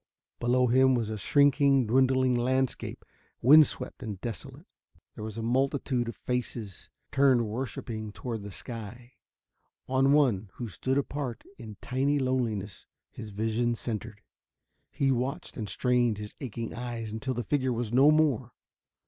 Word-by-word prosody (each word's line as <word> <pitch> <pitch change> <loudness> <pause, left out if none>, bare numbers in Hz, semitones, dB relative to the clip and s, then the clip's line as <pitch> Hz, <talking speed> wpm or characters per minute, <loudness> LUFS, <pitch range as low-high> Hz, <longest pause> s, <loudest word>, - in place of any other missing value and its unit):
Below 125 +1 +3
him 130 +2 +4
was 115 -3 -1
a 110 - -3
shrinking, 140 0 +4
dwindling 130 +2 +3
landscape, 130 +2 -1 0.3
wind 150 +5 +8
swept - - -6
and 105 -6 -5
desolate. 115 -5 -7 0.5
There - - -8
was 110 0 -6
a 115 - -3
multitude 130 0 0
of - - -7
faces, 120 -5 -4 0.2
turned 130 -4 +4
worshipping 110 -2 -5
toward 115 0 -5
the 100 - -7
sky. 115 +3 -8 0.7
On 135 +1 +3
one, 120 -9 +3
who 120 - -5
stood 130 +6 -2
apart 140 -3 -3 0.2
in 110 -4 -9
tiny 135 +3 0
loneliness, 120 -7 -2 0.2
his 110 - -8
vision 115 +3 0
centered. 110 -2 -5 0.7
He 135 -1 +1
watched 130 +3 -2
and 110 -4 -5
strained 120 -3 +1
his 105 0 -7
aching 115 -3 -5
eyes 120 -2 -5
until 125 +4 -3
the 120 - -2
figure 130 +2 0
was 120 -1 -3
no 135 +4 +6
more. 145 -6 +2
120 Hz, 145 wpm, -28 LUFS, 110-130 Hz, 0.7 s, wind